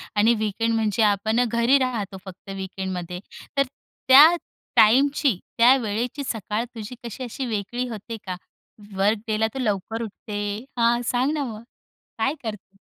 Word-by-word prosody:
आणि 215 +3 +5
वीकेंड 220 +2 -1
म्हणजे 220 0 +1
आपण 215 +3 +2
अ, - - +5
घरी 235 +4 +3
राहतो. 225 -7 -2
फक्त 190 +1 -11
वीकेंडमध्ये. 185 -2 -5 0.4
तर 275 - +5 0.4
त्या 270 +4 +10 0.5
टाईमची, 265 - +4 0.2
त्या 245 +3 +7
वेळेची 240 +4 -3
सकाळ 215 -1 -2
तुझी 225 +2 -7
कशी 235 +3 -6
अशी 255 +2 -4
वेगळी 235 +3 -3
होते 225 0 -6
का? 185 -2 -3 0.6
वर्क 205 +3 +2
डेला 220 0 +1
तू 270 - -5
लवकर 220 -1 -2
उठते. 205 0 -6 0.4
हां, 235 +1 +3
सांग 255 +5 +1
ना, 300 -2 -1
मग 220 -5 -6 0.6
काय 245 +6 +1
करते? 210 -3 -7
225 Hz, 150 wpm, -24 LUFS, 205-245 Hz, 0.6 s, त्या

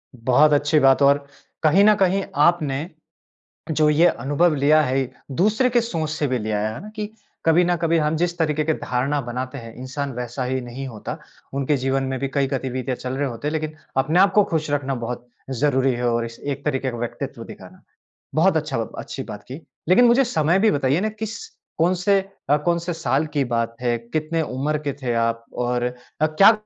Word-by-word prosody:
बहुत 130 +6 +4
अच्छी 145 +2 +3
बात 135 0 +4
और 140 0 +4 0.4
कहीं 160 +6 +5
न 210 0 +6
कहीं 195 0 +2 0.2
आपने 150 -1 +2 0.8
जो 155 0 +3
ये 155 +4 +5
अनुभव 155 +3 +1
लिया 150 +2 +4
है, 130 -2 0 0.2
दूसरे 215 - +2
की 240 -1 +3
सोच 165 -9 -3
से 155 -2 -1
भी 130 -1 0
लिया 105 -1 -1
है, 110 +1 -1
है 120 - -8
ना। 210 - -9
कि 210 -1 -4 0.4
कभी 165 +2 +5
न 175 - +2
कभी 165 0 +2
हम 155 0 +1
जिस 175 +1 -1
तरीके 155 -2 +1
की 160 - +2
धारणा 135 +2 -1
बनाते 125 +2 -5
हैं, 115 -3 -9
इंसान 130 +2 -4
वैसा 125 +2 -4
ही 130 +1 -1
नहीं 125 +2 -6
होता। 110 -4 -6 0.4
उनके 140 +1 +1
जीवन 135 +1 0
में 130 0 -2
भी 135 - -1
कई 140 -1 +2
गतिविधियाँ 130 -1 -2
चल 130 +1 -4
रहे 145 0 0
होते 120 +4 -5
हैं, - - -1
लेकिन 155 -1 -2 0.2
अपने 150 +6 +2
आप 195 +1 +5
को 210 0 +6
खुश 160 -4 -2
रखना 140 -2 -1
बहुत 120 0 -5 0.2
ज़रूरी 130 0 +1
है 120 0 -1
और 115 0 0
इस 115 0 -10
एक 140 -1 -4
तरीके 135 -2 0
का 120 - -6
व्यक्तित्व 120 0 -5
दिखाना। - - -13 0.5
बहुत 160 +2 +4
अच्छा 150 -5 -2
ब 115 - -4
अच्छी - - -6
बात 105 - -9
की। 135 +6 -8 0.3
लेकिन 215 +7 +6
मुझे 240 +3 +5
समय 170 -5 +2
भी 220 +1 +4
बताइए 140 +3 +1
ना 215 - 0
किस 220 +1 -6 0.4
कौन-से 180 +4 +3 0.3
अ, 145 - +5
कौन-से 170 0 0
साल 160 -2 0
की 140 - +3
बात 115 -1 -1
है, 120 -1 +1
कितने 155 +7 -2
उम्र 150 +1 -1
के 140 - 0
थे 120 -2 0
आप 115 0 -3
और 125 0 -1 0.4
अ, 155 - +5
क्या 195 +8 +7
145 Hz, 205 wpm, -22 LUFS, 130-165 Hz, 0.8 s, क्या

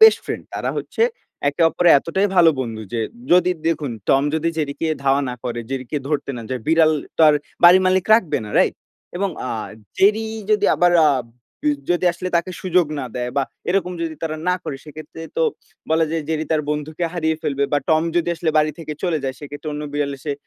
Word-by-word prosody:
Best 445 0 +9
friend. - - -4
তারা - - -2
হচ্ছে 455 - -2 0.5
একে 145 +4 0
অপরের 175 0 +4
এতটাই 190 +7 0
ভালো 170 -2 +7
বন্ধু 115 -3 -4
যে 115 - -1 0.3
যদি 180 0 +5 0.2
দেখুন, 150 -5 -1 0.2
টম 135 - +4
যদি 160 +1 0
জেরি 140 -2 -1 0.3
ধাওয়া 135 +1 +3
না - - -4
করে, 120 -1 -3
জেরিকে 135 +1 -3
ধরতে 150 -2 -1
না 120 - -6
যায়। 130 -1 -2
বিড়ালটার 160 0 +3
আর 150 - +5 0.3
বাড়ির 180 +2 +8
মালিক 185 0 +2
রাখবে 195 -8 +1
না 105 - -8
রাইট? - - +3 0.4
এবং 195 +1 0 0.2
আ - - -3 0.5
জেরি 215 +3 +4 0.3
যদি 215 - +3
আবার 175 0 +4
আ - - +6 0.5
বি 150 - +3 0.2
যদি 175 +1 +1
আসলে 180 +1 -5
তাকে 170 +2 -1
সুযোগ 180 -2 +3
না 130 - -4
দেয় 125 0 -2
বা 140 - +3 0.3
এরকম 180 0 +1
যদি 160 -1 -3
তারা 160 -1 -2
না 180 - +3
করে 135 - -4
সেক্ষেত্রে 155 +1 -10
তো - - +2 0.5
বলা 160 0 +3
যায় 165 -1 -1
জেরি 160 -1 -1
তার 155 -1 +1
বন্ধুকে 150 +3 -3
হারিয়ে 160 -2 0
ফেলবে। 140 -1 0
বা 145 - +4
টম 160 -1 +4
যদি 175 0 +1
আসলে 165 -1 -1
বাড়ি 155 0 +2
থেকে 155 -2 -6
চলে 170 -4 +1
যায় 130 -1 -2
সেক্ষেত্রে 145 +1 -8
অন্য 150 0 -4
বিড়াল 145 -1 -1
এসে 145 +2 -3
160 Hz, 200 wpm, -21 LUFS, 145-175 Hz, 0.5 s, Best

